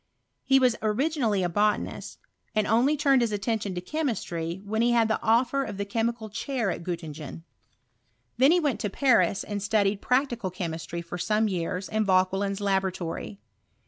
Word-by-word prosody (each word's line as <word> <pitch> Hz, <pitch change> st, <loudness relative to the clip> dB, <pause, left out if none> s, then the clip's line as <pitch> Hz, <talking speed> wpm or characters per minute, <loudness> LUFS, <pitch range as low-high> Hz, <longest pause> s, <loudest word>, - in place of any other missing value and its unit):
He 270 Hz, -, +4 dB
was 255 Hz, -3 st, +3 dB
originally 220 Hz, -, +1 dB
a -, -, +2 dB
botanist, 210 Hz, +4 st, -1 dB, 0.4 s
and 215 Hz, -1 st, +2 dB
only 250 Hz, +8 st, +3 dB
turned 275 Hz, -3 st, +4 dB
his 235 Hz, -2 st, +1 dB
attention 205 Hz, -1 st, -2 dB
to 180 Hz, -, -3 dB
chemistry 180 Hz, -, -3 dB
when 220 Hz, +2 st, -1 dB
he 240 Hz, +1 st, +3 dB
had 230 Hz, -2 st, +4 dB
the 220 Hz, -, -1 dB
offer 245 Hz, +4 st, +2 dB
of 205 Hz, -, -6 dB
the 200 Hz, -, -2 dB
chemical 230 Hz, +1 st, -2 dB
chair 230 Hz, 0 st, -2 dB
at -, -, -5 dB
Gioti. 170 Hz, -3 st, -4 dB
tingeii. 155 Hz, +1 st, -9 dB, 0.9 s
He 265 Hz, +3 st, +5 dB
then 350 Hz, +1 st, +3 dB
went 270 Hz, -8 st, 0 dB
to 210 Hz, -, -2 dB
Paris, 200 Hz, -5 st, +2 dB
and 205 Hz, -1 st, -4 dB
studied 205 Hz, -1 st, +1 dB
prac^ 260 Hz, +3 st, +2 dB
cal 190 Hz, -, -2 dB
chemistry 170 Hz, -1 st, -5 dB
for 175 Hz, +1 st, -7 dB
some 215 Hz, +4 st, +1 dB
years 180 Hz, 0 st, -3 dB
in 220 Hz, 0 st, 0 dB
Vauquelin's 195 Hz, +1 st, +1 dB
labora 195 Hz, -2 st, +1 dB
tory. 165 Hz, -, -6 dB
210 Hz, 175 wpm, -27 LUFS, 185-235 Hz, 0.9 s, He